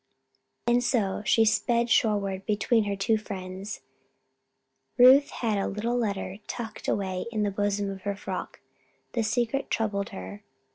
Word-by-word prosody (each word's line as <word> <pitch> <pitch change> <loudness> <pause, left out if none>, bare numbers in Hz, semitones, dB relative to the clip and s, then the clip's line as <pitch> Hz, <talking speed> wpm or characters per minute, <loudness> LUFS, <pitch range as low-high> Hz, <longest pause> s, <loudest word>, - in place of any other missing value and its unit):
And 240 +1 +3
so, 215 -6 +1
as 205 - -5
she 225 - +5
sped 235 +2 +2
shoreward 200 -4 +1
between 215 +1 +2
her 200 -1 -1
two 220 +3 +1
friends, 195 0 -6 1.2
Ruth 265 +3 +8
had 220 -4 -1
the - - 0
little 225 +4 -2
letter 200 -5 -2
tucked 225 -3 -6
away 190 -1 -1
in 215 -2 0
the 205 - 0
bosom 205 0 -1
of 190 -1 -8
her 200 +1 -2
frock. 205 - -6 0.5
The 235 - +1
secret 235 +4 0
troubled 200 -3 -1
her. 95 +2 -8
210 Hz, 150 wpm, -27 LUFS, 195-230 Hz, 1.2 s, Ruth